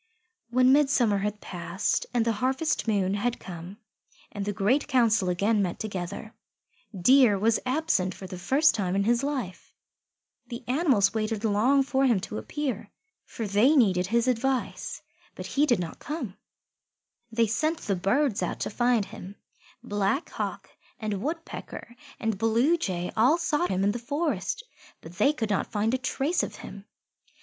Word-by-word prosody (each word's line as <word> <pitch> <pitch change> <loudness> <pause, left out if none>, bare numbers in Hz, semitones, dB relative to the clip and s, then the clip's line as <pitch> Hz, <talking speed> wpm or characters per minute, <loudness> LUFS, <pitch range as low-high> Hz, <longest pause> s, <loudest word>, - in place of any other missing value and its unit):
When 255 +2 +4
midsummer 265 -8 +3
had 210 +1 -3
passed 180 +3 -2
and 240 -2 +1
the 230 - +2
harvest 265 +2 0
moon 195 -3 +1
had 230 +4 -1
come 175 +2 -9 0.5
and 205 - -4
the 205 - -1
Great 210 +9 +1
Council 225 -7 +3
again 205 +4 +1
met 180 -3 -2
together, 200 +1 -5 0.7
Deer 245 +1 +5
was 220 +3 +2
absent 255 - 0
for 190 - -9
the 185 -1 -7
first 290 +10 +3
time 190 -4 -1
in 200 - +2
his 235 +3 +2
life. 265 -10 -4 0.7
The 235 -1 -7
animals 250 - +3
waited 220 0 -2
long 235 +7 +3
for 270 0 +1
him 235 -6 +3
to 215 - -5
appear, 250 -8 -4 0.4
for 225 - -5
they 210 +9 +4
needed 185 -9 +3
his 235 +4 +1
advice, 255 +1 -1 0.3
but - - -7
he 290 +2 +1
did 240 -5 +3
not 170 -2 -5
come. 270 - -5 1.0
They 230 0 +2
sent 310 +10 -1
the 200 - -1
Birds 210 +6 +1
out - - -2
to - - -2
find 240 -1 +2
him. 200 -1 -10 0.5
Black 205 +7 -1
Hawk - - -5 0.3
and 210 -4 -3
Woodpecker 315 -4 -6 0.2
and 220 -4 -2
Bluejay 225 - +1
all 250 +9 +4
sought 300 - 0
him 190 0 0
in 200 - +3
the 240 - -4
forest, 285 - -2 0.4
but 170 +2 -13
they 280 - +5
could 225 -8 -3
not 195 - -1
find 215 +2 0
a 260 - +1
trace 275 +5 0
of - - -5
him. 200 0 -10
225 Hz, 160 wpm, -27 LUFS, 200-265 Hz, 1.0 s, Deer